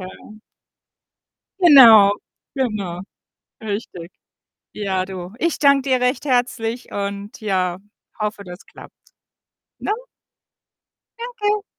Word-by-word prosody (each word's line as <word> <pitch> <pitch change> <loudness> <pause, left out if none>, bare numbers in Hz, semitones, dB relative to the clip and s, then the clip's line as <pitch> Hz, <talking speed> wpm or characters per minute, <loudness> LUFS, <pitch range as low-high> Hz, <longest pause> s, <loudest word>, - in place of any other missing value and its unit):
Ja. 185 +3 -11 1.3
Genau, 230 - +8 0.4
genau, 210 -9 -3 0.6
richtig. 200 -5 -6 0.6
Ja, 190 -3 -2
du. 185 -1 -8
Ich 335 -1 0
danke 280 -2 +3
dir 255 -1 +2
recht 250 +3 0
herzlich 245 -2 -1
und 200 +1 -5
ja, 185 -5 -1 0.4
hoffe, 210 -1 -3
das 180 0 -11
klappt, - - -15 0.9
ne? - - -3 1.3
Danke. 425 -4 -2
215 Hz, 90 wpm, -20 LUFS, 195-265 Hz, 1.3 s, Genau